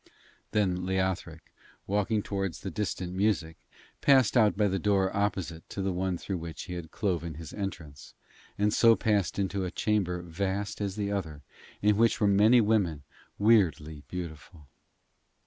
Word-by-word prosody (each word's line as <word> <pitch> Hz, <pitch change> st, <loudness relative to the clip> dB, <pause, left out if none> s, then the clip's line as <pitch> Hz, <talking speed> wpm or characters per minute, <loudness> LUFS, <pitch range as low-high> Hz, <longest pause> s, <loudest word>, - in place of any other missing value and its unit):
Then 95 Hz, -4 st, 0 dB
Leothric, 95 Hz, -4 st, -2 dB, 0.3 s
walking 105 Hz, +1 st, 0 dB
towards 95 Hz, -4 st, -3 dB
the 95 Hz, -, -5 dB
distant 90 Hz, -2 st, -3 dB
music, 95 Hz, -5 st, 0 dB, 0.5 s
passed 130 Hz, -5 st, +4 dB
out 110 Hz, -5 st, +4 dB
by 105 Hz, -1 st, +3 dB
the 95 Hz, 0 st, -1 dB
door 95 Hz, 0 st, +1 dB
opposite 95 Hz, -5 st, -2 dB
to 100 Hz, -, -4 dB
the 95 Hz, -, 0 dB
one 90 Hz, 0 st, -1 dB
through 95 Hz, +1 st, -4 dB
which 80 Hz, -1 st, -7 dB
he 90 Hz, -, -7 dB
had 85 Hz, -2 st, -6 dB
cloven 85 Hz, -6 st, -2 dB
his 80 Hz, -1 st, -9 dB
entrance, 85 Hz, -8 st, -7 dB, 0.4 s
and 105 Hz, +1 st, +2 dB
so 115 Hz, -1 st, +6 dB
passed 105 Hz, -7 st, 0 dB
into 100 Hz, 0 st, -1 dB
a 90 Hz, -, -2 dB
chamber 90 Hz, -4 st, -1 dB
vast 100 Hz, +4 st, -3 dB
as 100 Hz, -2 st, -2 dB
the 100 Hz, -1 st, -2 dB
other, 80 Hz, -8 st, -4 dB, 0.4 s
in 105 Hz, 0 st, +4 dB
which 115 Hz, +1 st, +3 dB
were 105 Hz, -, +2 dB
many 105 Hz, +4 st, +5 dB
women, 100 Hz, -9 st, +1 dB, 0.3 s
weirdly 85 Hz, -9 st, +2 dB
beautiful. 85 Hz, -2 st, -8 dB
95 Hz, 155 wpm, -29 LUFS, 85-105 Hz, 0.5 s, so